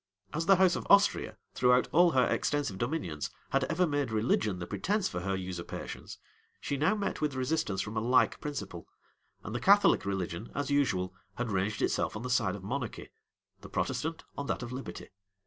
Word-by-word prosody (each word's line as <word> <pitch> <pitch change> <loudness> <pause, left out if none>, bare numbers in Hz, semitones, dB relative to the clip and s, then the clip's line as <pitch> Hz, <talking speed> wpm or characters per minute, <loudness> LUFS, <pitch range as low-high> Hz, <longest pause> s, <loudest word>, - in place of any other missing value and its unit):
As 165 +2 -2
the 195 - +8
house 185 -1 +4
of - - -5
Austria, 200 0 +4 0.2
throughout 125 0 +4
all 175 +2 +6
her 130 -2 +4
extensive 145 -10 -1
dominions, 120 - -2 0.2
had 135 -1 +2
ever 165 +6 +1
made 145 -4 0
religion 110 -2 +1
the 90 - -5
pretence 185 - 0
for 90 - -4
her 95 +2 -1
usurpations, 90 -2 -6 0.4
she 140 - -2
now 155 +9 +2
met 205 -6 -3
with 150 -3 0
resistance 130 -7 0
from 110 +2 -5
a 110 - 0
like 125 +3 +3
principle; 100 - -5 0.6
and 105 - -6
the 120 - -1
Catholic 200 - +5
religion, 95 0 -3
as 145 0 -2
usual, 95 -11 +1 0.2
had 120 -2 -2
ranged 100 +2 0
itself - - 0
on 110 - -5
the 125 - -3
side 110 -6 +2
of 100 - -9
monarchy; 125 +3 -4 0.5
the - - -11
Protestant, 160 +1 -2
on 140 - -4
that - - -2
of 120 - -6
liberty. 130 +1 -7
125 Hz, 185 wpm, -30 LUFS, 100-150 Hz, 0.6 s, the